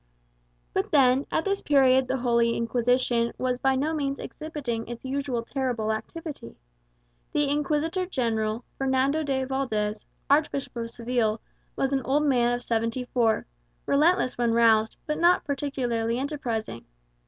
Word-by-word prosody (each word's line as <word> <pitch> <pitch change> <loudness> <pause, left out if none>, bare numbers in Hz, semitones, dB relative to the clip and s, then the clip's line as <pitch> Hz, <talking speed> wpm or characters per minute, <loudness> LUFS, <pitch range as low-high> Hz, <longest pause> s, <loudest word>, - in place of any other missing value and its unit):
But - - 0
then, 265 -1 +4
at 320 - 0
this 395 0 0
period 265 -2 +4
the 260 +1 0
Holy 235 -2 +2
Inquisition 240 0 +1
was 250 -1 -1
by 270 0 +2
no 295 +5 0
means 280 -3 -1
exhibiting 270 -8 -5
its 240 +2 -8
usual 260 -3 -2
terrible 245 -4 -2
activity. 290 - -6 0.8
The 295 -1 +2
Inquisitor 300 +5 0
General, 225 - -1
Fernando 270 +3 +1
de 270 -3 -1
Valdez, 220 -6 -2 0.2
Archbishop 280 -2 +1
of 230 -1 -4
Seville, 230 -2 0 0.4
was 270 0 0
an 270 - +1
old 280 +3 +1
man 245 -4 +3
of 245 0 -2
seventy 230 +2 -1
four, 230 -3 +2 0.4
relentless 300 -3 +2
when 235 -1 +2
roused, 225 -1 +4
but 300 - -2
not 345 +1 +4
particularly 245 -5 -1
enterprising. 245 - -3
255 Hz, 140 wpm, -26 LUFS, 235-280 Hz, 0.8 s, then